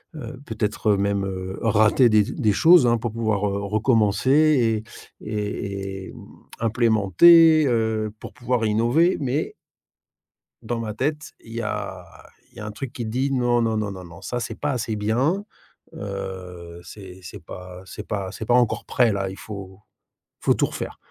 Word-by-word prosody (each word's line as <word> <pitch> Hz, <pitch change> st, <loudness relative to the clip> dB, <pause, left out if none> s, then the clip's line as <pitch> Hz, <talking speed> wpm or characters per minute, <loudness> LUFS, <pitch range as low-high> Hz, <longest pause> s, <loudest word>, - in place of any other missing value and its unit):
heu, 130 Hz, -2 st, -8 dB
peut-être 105 Hz, -1 st, 0 dB
même, 100 Hz, 0 st, 0 dB
heu, 95 Hz, 0 st, -5 dB
rater 115 Hz, +2 st, +4 dB
des 105 Hz, -1 st, +5 dB
z -, -, -6 dB
des 105 Hz, -, +2 dB
choses, 165 Hz, -, +6 dB
hein, 120 Hz, 0 st, +3 dB
pour 115 Hz, -1 st, -3 dB
pouvoir, 110 Hz, -3 st, 0 dB
heu, 100 Hz, 0 st, -2 dB
recommencer 115 Hz, +3 st, +2 dB, 0.4 s
et -, -, -13 dB
et 100 Hz, -2 st, -4 dB
et, -, -, -11 dB
mmh, -, -, -12 dB, 0.3 s
implémenter, 120 Hz, -, +5 dB
heu, 110 Hz, -3 st, 0 dB
pour -, -, -9 dB
pouvoir 125 Hz, -1 st, -1 dB
innover. 120 Hz, -, +2 dB
Mais 140 Hz, +2 st, -2 dB, 1.1 s
dans 115 Hz, +1 st, -3 dB
ma 110 Hz, -2 st, -4 dB
tête, 150 Hz, +6 st, -3 dB
il 115 Hz, -, -13 dB
y 115 Hz, -, -3 dB
a 110 Hz, -, -4 dB, 0.5 s
il -, -, -20 dB
y -, -, -8 dB
a -, -, -6 dB
un 105 Hz, -, -5 dB
truc 120 Hz, +3 st, -6 dB
qui 120 Hz, -3 st, -5 dB
dit: 130 Hz, +5 st, -1 dB
«Non, 120 Hz, -2 st, +2 dB
non, 110 Hz, -1 st, 0 dB
non, 105 Hz, -2 st, -2 dB
non, 95 Hz, -1 st, -8 dB
non, 85 Hz, 0 st, -13 dB
ça 125 Hz, -, -3 dB
c'est 110 Hz, -, -5 dB
pas 145 Hz, 0 st, -2 dB
assez 115 Hz, -3 st, -2 dB
bien, 130 Hz, -, 0 dB, 0.5 s
heu, 90 Hz, -3 st, -7 dB
c'est 95 Hz, -2 st, -11 dB
c'est 100 Hz, +4 st, -9 dB
pas 90 Hz, +1 st, -10 dB
c'est 105 Hz, +3 st, -8 dB
pas 100 Hz, -2 st, -3 dB
c'est 110 Hz, -, -7 dB
pas 120 Hz, -, +3 dB
encore 120 Hz, -2 st, +2 dB
prêt, 120 Hz, -3 st, +2 dB
là, 95 Hz, -1 st, -2 dB
il 95 Hz, -, -9 dB
faut 100 Hz, -2 st, -9 dB, 0.6 s
il -, -, -17 dB
faut -, -, +4 dB
tout -, -, +1 dB
refaire». -, -, -6 dB
110 Hz, 180 wpm, -23 LUFS, 100-120 Hz, 1.1 s, choses